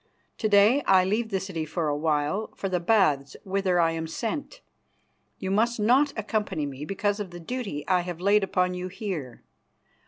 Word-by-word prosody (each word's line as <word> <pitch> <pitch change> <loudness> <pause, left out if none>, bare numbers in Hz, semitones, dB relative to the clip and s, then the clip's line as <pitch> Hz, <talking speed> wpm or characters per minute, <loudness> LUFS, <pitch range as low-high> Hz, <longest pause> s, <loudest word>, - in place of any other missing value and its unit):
To 215 - 0
day 210 +7 +5
I 185 -1 +5
leave 220 +4 0
the 195 -3 0
city 185 -4 -4
for 155 +1 -2
a 145 - 0
while 150 +7 0
for 195 - -3
the 185 -2 0
Baths 170 -8 +2
whither 190 -2 0
I 165 -1 +3
am 165 0 -3
sent. 280 - -4 0.8
You 190 -1 -4
must 230 +4 +1
not 260 +7 +4
accompany 205 -7 -2
me 140 +1 -6
because 200 +3 -1
of 205 -3 -4
the 175 0 -9
duty 195 - -5
I 185 -1 +3
have 175 -1 -6
laid 200 +2 +3
upon 180 -1 +1
you 180 0 -4
here. 180 - -6
190 Hz, 185 wpm, -26 LUFS, 165-210 Hz, 0.8 s, day